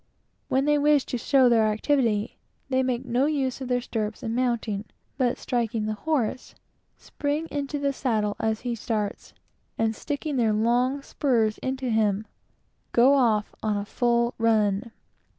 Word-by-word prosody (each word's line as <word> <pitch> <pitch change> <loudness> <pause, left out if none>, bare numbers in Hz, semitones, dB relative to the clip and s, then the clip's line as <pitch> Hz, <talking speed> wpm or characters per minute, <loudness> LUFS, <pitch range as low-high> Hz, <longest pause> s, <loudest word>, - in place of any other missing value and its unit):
When 265 +1 +1
they 295 0 +3
wish 295 -1 +3
to 245 - -3
show 265 +1 +4
their 225 -2 +4
activity, 220 -1 0 0.3
they 260 0 +2
make 255 0 -1
no 250 +3 +1
use 275 -4 -1
of 260 - -4
their 245 0 +1
stirrups 220 0 -4
in 225 -1 -2
mounting, 235 -4 -1 0.3
but 250 -3 +1
striking 230 -3 -1
the 215 - -1
horse, 255 0 -2 0.4
spring 295 +2 -3
into 290 0 -3
the 280 -1 0
saddle 215 -6 0
as 220 -1 -1
he 245 -1 -2
starts, 215 -2 -3 0.5
and 225 0 0
sticking 290 +3 -3
their 225 -3 +2
long 245 +5 +1
spurs 230 -8 0
into 260 -1 -2
him, 215 -1 +1 0.7
go 250 +4 +6
off 225 -6 +2
on 215 -1 0
the 200 0 -2
full 235 +1 +1
run. 220 -1 +2
240 Hz, 155 wpm, -26 LUFS, 220-270 Hz, 0.7 s, go